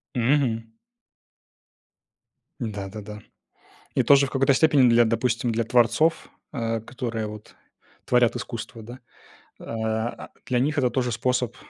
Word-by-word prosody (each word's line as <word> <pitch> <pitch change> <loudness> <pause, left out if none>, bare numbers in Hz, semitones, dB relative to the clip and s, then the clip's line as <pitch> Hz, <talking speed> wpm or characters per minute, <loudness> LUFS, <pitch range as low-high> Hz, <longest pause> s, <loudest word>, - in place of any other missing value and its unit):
Мгм. 120 -2 +1 2.0
Да-да-да. 105 -2 -6 0.8
И - - +3
тоже 140 0 +5
в - - -9
какой-то 135 0 +3
степени 140 -3 +4
для 120 0 +5
допустим, 115 +1 0
для 115 +1 0
творцов, 125 +8 +2 0.2
э, 115 -4 -2
которые 115 -2 -4
вот 105 0 -11 0.5
творят 125 -2 +3
искусство, 115 -1 -6
да. 120 +4 -10 0.6
Э, - - -12
а_ 110 +1 -3 0.2
для 125 -1 0
них 130 - +2
них - - -9
это 125 -3 +2
тоже 125 -1 -1
способ 125 0 -1
120 Hz, 130 wpm, -24 LUFS, 115-125 Hz, 2.0 s, тоже